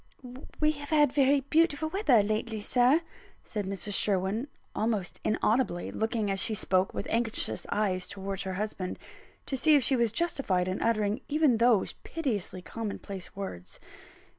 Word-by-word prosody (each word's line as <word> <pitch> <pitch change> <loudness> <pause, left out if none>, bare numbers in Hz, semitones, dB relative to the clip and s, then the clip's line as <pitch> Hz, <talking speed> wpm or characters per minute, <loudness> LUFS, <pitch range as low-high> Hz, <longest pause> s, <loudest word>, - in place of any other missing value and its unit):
"We 305 0 +4
have 290 -1 -8
had 295 -4 +4
very 280 0 +4
beautiful 315 +2 +2
weather 300 - +3
lately, 215 +1 -2
Sir," 250 +8 +3 0.4
said 205 -3 -4
Mrs. 195 +1 -3
Sherwin, 200 +6 +1 0.3
almost 215 -5 -2
inaudibly; 215 -4 0
looking 220 -2 -1
as 195 - -1
she 215 +2 +2
spoke, 185 -1 +1
with - - -4
anxious 230 -1 -1
eyes 185 -4 0
towards 195 0 -5
her 190 -1 -3
husband, 200 -2 -3 0.5
to 270 - -3
see 305 +4 +5
if 280 - +4
she 265 - +4
was 235 -3 +2
justified 225 - 0
in 185 - -2
uttering 215 +1 +1
even 295 -5 +3
those 230 -3 +3
piteously 215 - -3
common 220 -1 -5
place 195 -3 -9
words. 90 - -7
220 Hz, 155 wpm, -29 LUFS, 195-275 Hz, 0.5 s, see